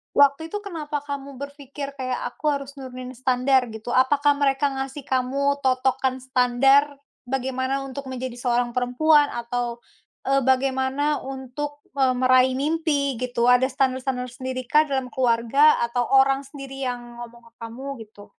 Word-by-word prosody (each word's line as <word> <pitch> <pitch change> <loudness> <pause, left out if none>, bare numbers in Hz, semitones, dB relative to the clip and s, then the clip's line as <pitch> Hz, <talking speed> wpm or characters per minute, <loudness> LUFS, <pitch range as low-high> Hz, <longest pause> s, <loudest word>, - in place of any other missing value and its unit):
Waktu 285 +3 +3
itu 415 - -2
kenapa 315 -7 -4
kamu 280 -2 -7
berpikir 280 0 -7
kayak 255 -2 -3 0.2
aku 300 0 0
harus 280 0 -4
nurunin 255 -1 -8
standar 255 -1 +2
gitu? 220 +3 -5
Apakah 285 +2 +3
mereka 280 0 +2
ngasih 270 0 -5
kamu 275 +2 0
totokan 260 0 +1
standar, 270 +3 +3 0.2
bagaimana 260 +1 -2
untuk 265 0 -7
menjadi 255 -1 -5
seorang 245 -1 -1
perempuan 290 +4 +3
atau, 240 0 -3 0.5
eee, 275 -1 +3
bagaimana 265 +2 +1
untuk, 270 +2 -6 0.2
eee, 265 -2 +3
meraih 255 0 +4
mimpi 295 -3 0
gitu? 245 -1 0
Ada 250 +1 +4
standar-standar 260 -1 -1
tersendirikah 255 +4 0
dalam 265 -2 -1
keluarga 250 +4 +3
atau 235 +1 0
orang 270 +1 +4
sendiri 275 -1 -8
yang 240 -1 -5
ngomong 235 0 -14
ke - - -20
kamu 240 +5 -8 0.2
gitu? 210 -1 -16
265 Hz, 140 wpm, -23 LUFS, 250-280 Hz, 0.5 s, meraih